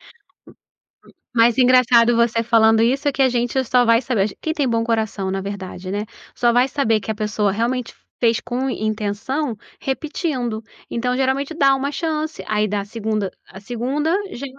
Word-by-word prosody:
Hum, - - -21 1.3
mas 235 +1 +4
engraçado 245 -2 +5
você 230 0 +2
falando 225 -1 +4
isso, 270 +5 +1
é - - +3
que 275 - -2
a 260 - +5
gente 245 +2 0
só 245 0 +3
vai 230 0 +4
saber 215 -5 -1
quem 315 - -1
tem 290 -4 0
bom 230 -1 +1
coração 220 -4 -1
na 195 0 -2
verdade, 190 -2 -6
né. 205 +2 -2 0.3
Só 240 -1 +3
vai 245 +2 +4
saber 230 -6 +1
que 220 - -4
a 215 - -4
pessoa 210 -1 0
realmente 235 +3 -2 0.3
fez 230 -2 +3
com 255 +2 -2
intenção, 215 +5 -2 0.3
repetindo. 265 -4 -2 0.3
Então 250 +1 -1
geralmente 270 +3 0
dá 275 -4 +4
uma 275 +1 -2
chance, 315 0 -3
aí 215 0 +1
dá 205 0 -1
a - - -8
2ª, 215 -2 -2 0.2
a 190 - -12
2ª 255 +9 -1 0.2
já 270 - -6
235 Hz, 175 wpm, -20 LUFS, 215-265 Hz, 1.3 s, engraçado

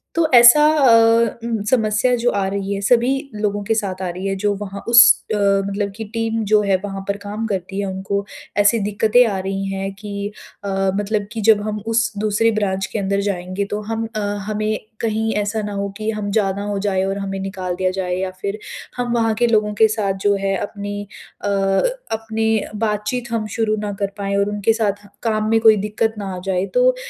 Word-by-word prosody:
तो 330 -2 +3
ऐसा 240 +5 +9
अ, 230 -4 +4
उम, 230 -3 -2
समस्या 220 0 +2
जो 240 +1 +1
आ 195 -1 0
रही 200 0 -2
है 200 - -3
सभी 240 +4 +3 0.3
लोगों 205 -1 -1
के 225 - 0
साथ 190 -4 -2
आ 185 - -2
रही 185 +3 -4
है 195 - -1
जो 205 -1 +2
वहाँ 200 -1 -6
उस 240 +1 +9 0.3
अ, - - 0
मतलब 200 0 +1
कि 225 - -4
टीम 225 -1 -1
जो 210 -1 +6
है 200 -2 +2
वहाँ 195 -1 -5
पर 200 0 -1
काम 205 +2 -5
करती 195 -1 -3
है। 200 - -1
उनको 195 +1 -3 0.3
ऐसी 210 +3 +4
दिक़्क़तें 215 +4 +3
आ 200 -3 -2
रही 195 +1 -3
हैं 195 0 -3
कि 205 0 -5 0.3
अ, 200 - -3 0.3
मतलब 205 0 -1
कि 225 - -4
जब 210 -2 +6
हम 210 0 -3
उस 230 +1 +1
दूसरी 215 +2 +2
ब्रांच 195 -3 -1
के 215 - -2
अंदर 200 0 0
जाएँगे 185 +1 -2
तो 210 0 -2
हम 225 0 -2
अ, - - -1 0.3
हमें 215 0 -1 0.2
कहीं 220 0 0
ऐसा 215 +1 -2
ना 205 0 -4
हो 200 0 -2
कि 215 0 -3
हम 210 -1 -4
ज़्यादा 200 -2 0
हो 205 -1 -2
जाए 190 -1 +1
और 195 +1 -2
हमें 195 -1 -4
निकाल 185 -2 -4
दिया 185 0 0
जाए 180 -1 -1
या 185 0 -2
फ़िर 200 +1 -3 0.4
हम 245 -1 -2
वहाँ 225 -1 +2
के 240 - +4
लोगों 215 -2 +2
के 220 +1 +5
साथ 210 -3 -1
जो 205 0 +4
है 195 0 0
अपनी 205 0 -5 0.4
अ, - - -1
अपनी 220 - 0 0.3
बातचीत 220 +3 -3
हम 220 -2 -1
शुरू 220 -1 +1
ना 205 -1 -3
कर 200 0 -1
पाएँ 200 0 -2
और 200 +1 +1
उनके 210 +2 +1
साथ 205 -2 -2 0.2
काम 215 -1 0
में 225 0 +4
कोई 220 -1 +7
दिक़्क़त 220 +1 -1
ना 195 -2 -5
आ 180 - -6
जाए। 190 0 0
तो - - +4
205 Hz, 215 wpm, -20 LUFS, 195-225 Hz, 0.4 s, ऐसा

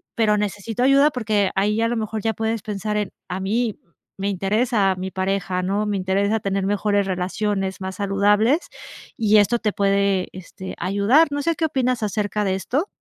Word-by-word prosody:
pero 215 -2 +2
necesito 210 +3 -3
ayuda", 275 +3 +5
porque 215 -6 0
ahí, 210 +3 +1
a 230 - +2
lo 240 - -1
mejor, 220 0 -3
ya 225 - +1
puedes 225 0 -2
pensar 210 0 -3
en: 210 -2 -2 0.2
"A 185 +1 -3
mí 220 +3 -1 0.4
me 195 +1 -1
interesa 200 +1 +1
mi 185 +1 -4
pareja, 190 -1 -1
¿no?, 200 +3 0
me 205 - -1
interesa 200 +3 +1
tener 195 -1 -1
mejores 205 0 +1
relaciones, 190 +1 -2
más 190 0 -4
saludables". 205 - +2 0.6
Y 215 -1 +4
esto 210 +4 +4
te 210 -3 -1
puede, 200 -1 +1
este, 185 +1 -9
ayudar. 205 - +3
No 285 0 -1
sé, 335 +3 0
¿qué 320 - 0
opinas 255 -5 0
acerca 210 0 -1
de 190 -2 0
esto? 275 - -1
205 Hz, 180 wpm, -22 LUFS, 195-225 Hz, 0.6 s, ayuda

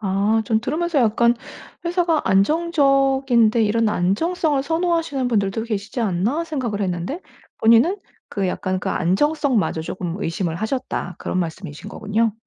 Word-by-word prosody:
아 205 +2 +1
좀 220 +1 +1
들으면서 315 +5 -1
약간 235 0 +3 0.5
'회사가 340 -2 +1
안정적인데 270 - +3
이런 220 +1 +2
안정성을 280 - 0
선호하시는 330 -3 0
분들도 205 -1 0
계시지 215 +1 -4
않나.' 220 - 0
생각을 255 -10 -3
했는데 185 - -3 0.4
본인은 235 - +5 0.3
그 195 -2 -2
약간 185 +1 -2
그 - - -3
안정성마저 230 - +1
쪼금 175 +1 -4
의심을 165 0 -2
하셨다 220 -5 -3
그런 185 - -3
말씀이신 165 -3 -5
거군요. 220 +2 0
230 Hz, 335 characters per minute, -21 LUFS, 195-290 Hz, 0.5 s, 본인은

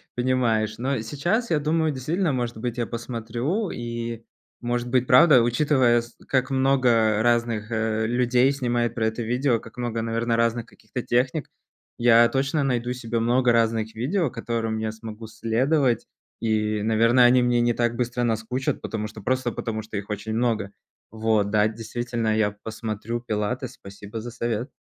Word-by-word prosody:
понимаешь. 120 -4 +1
Но 130 +1 -1
сейчас 175 - -1
я 155 - +3
думаю, 155 +1 +1
действительно, 155 +5 -1
может 120 -2 -2
быть, 120 +1 -4
я 120 - 0
посмотрю, 120 - -3
и, 115 -1 -5 0.4
может 120 0 -2
быть, 125 0 +2
правда, 130 0 +7
учитывая, 120 -1 +3
с 120 0 -14
как 130 -1 +1
много 125 -5 +3
разных, 115 -2 +1
э, 110 0 0
людей 125 +2 +3
снимают 120 -4 -1
про 110 -2 +1
это 110 +2 -3
видео, 125 +1 +1
как 115 +1 -14
много, 120 -2 -2
наверное, 115 +1 0
разных 115 0 +1
каких-то 110 +3 -7
техник. 130 +6 0 0.5
Я 120 0 +6
точно 135 +2 0
найду 125 -2 0
себе 115 -2 -3
много 120 +2 +3
разных 115 -1 +1
видео, 145 - -1
которым 115 -2 -2
я 110 0 -2
смогу 110 0 -9
следовать, 120 +4 +1 0.3
и, 110 -1 0
наверно, 115 +3 +4
они 125 +1 +5
мне 120 -1 +2
не 120 0 +2
так 120 0 0
быстро 120 0 -1
наскучат, 120 +3 -1
потому 105 -1 -4
что 105 0 -11
просто 130 +2 0
потому 110 -1 -4
что 110 0 -9
их 100 +1 -6
очень 105 +1 -4
много. 110 -4 0 0.4
Вот, 110 -2 +1
да, 105 0 +4
действительно, 115 0 -2
я 110 -1 +2
посмотрю 110 +1 -4
пилатес, 120 +3 -3
спасибо 100 +3 -9
за 120 +2 -7
совет. 115 +2 -3
120 Hz, 160 wpm, -24 LUFS, 110-125 Hz, 0.5 s, правда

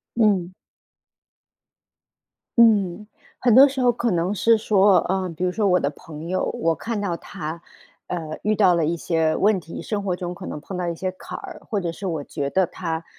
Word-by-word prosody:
嗯。 195 -6 +2 2.0
嗯， 210 -4 +4 0.3
很 245 -3 +3
多 270 +3 +9
时 270 -1 -3
候 245 -1 +5
可 235 -1 -1
能 175 +3 0
是 225 +3 +4
说， 200 -3 +4
呃， 190 0 0
比 180 - -4
如 180 - +1
说 210 +1 0
我 180 -1 +4
的 140 - 0
朋 155 +2 -10
友， 185 0 0
我 165 0 +1
看 225 +6 -4
到 175 -4 -2
她 160 +1 -7 0.5
呃， 160 -3 -5
遇 215 +1 +2
到 190 -4 +5
了 165 -2 +1
一 170 - 0
些 160 -1 0
问 205 -1 +3
题， 165 -1 -8
生 210 -2 -3
活 185 -2 0
中 175 -1 -5
可 185 0 -9
能 - - -5
碰 190 +4 -7
到 180 -1 -2
一 170 - -2
些 185 +2 -3
坎 - - -8
儿， - - -9
或 205 -3 -1
者 170 -2 -2
是 195 +4 -6
我 160 -5 -2
觉 140 -1 -4
得 190 +5 +2
她， 165 -2 -4
185 Hz, 220 characters per minute, -23 LUFS, 165-210 Hz, 2.0 s, 多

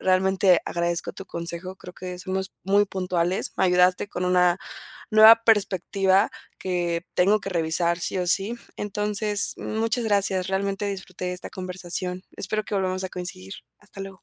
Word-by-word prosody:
realmente 190 -1 +3
agradezco 170 0 -2
tu 195 - -9
consejo, 170 +2 -5
creo 180 - -11
que 180 -1 -7
somos 190 +1 -4
muy 200 +2 +4
puntuales, 180 -1 -1
me - - +2
ayudaste 180 +2 +3
con 180 - -4
una 180 0 +3 0.5
nueva 220 +1 +9
perspectiva 195 -1 +2 0.3
que 175 -2 -2
tengo 200 +4 +3
que 195 - -6
revisar 170 0 +1
sí 185 - -1
o 180 - -1
sí, 200 +6 +1 0.2
entonces, 210 0 0
muchas 225 +2 -1
gracias, 195 -3 +1
realmente 195 +1 -1
disfruté 185 -2 -5
de 180 - -2
esta 180 - -7
conversación, 180 0 -4
espero 215 +2 -2
que 210 - -5
volvamos 185 -1 -1
a - - -3
coincidir, 135 - -6 0.3
hasta 205 -1 -13
luego. 195 -2 -9
185 Hz, 155 wpm, -24 LUFS, 180-200 Hz, 0.5 s, nueva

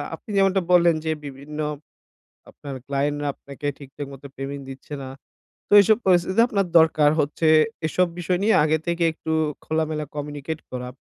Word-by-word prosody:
আপনি - - -20
যেমনটা 195 0 +3
বললেন 170 -2 +5
যে 160 - +1
বিভিন্ন 140 +2 -8 0.9
আপনার 140 -1 -9
ক্লায়েন্ট 140 +1 -1
রা - - -2
আপনাকে 140 +1 -9
ঠিকঠাক 140 0 -8
মতো 135 +1 -11
পেমেন্ট 140 +1 -5
দিচ্ছে 135 +2 -9
না। 130 - -7 0.6
তো - - -41
এসব 215 +2 +4
পরিস্থিতিতে 185 +3 +3
আপনার 200 -4 0
দরকার 155 -2 +4
হচ্ছে। 150 +2 0 0.4
এসব 180 +3 +2
বিষয় 175 +1 0
নিয়ে 220 +1 +4
আগে 155 +1 +2
থেকে 170 0 0
একটু 160 0 -6 0.3
খোলামেলা 155 -1 -1
কমিউনিকেট 145 +1 -5
করা। 125 -1 -5
155 Hz, 160 wpm, -23 LUFS, 140-175 Hz, 0.9 s, বললেন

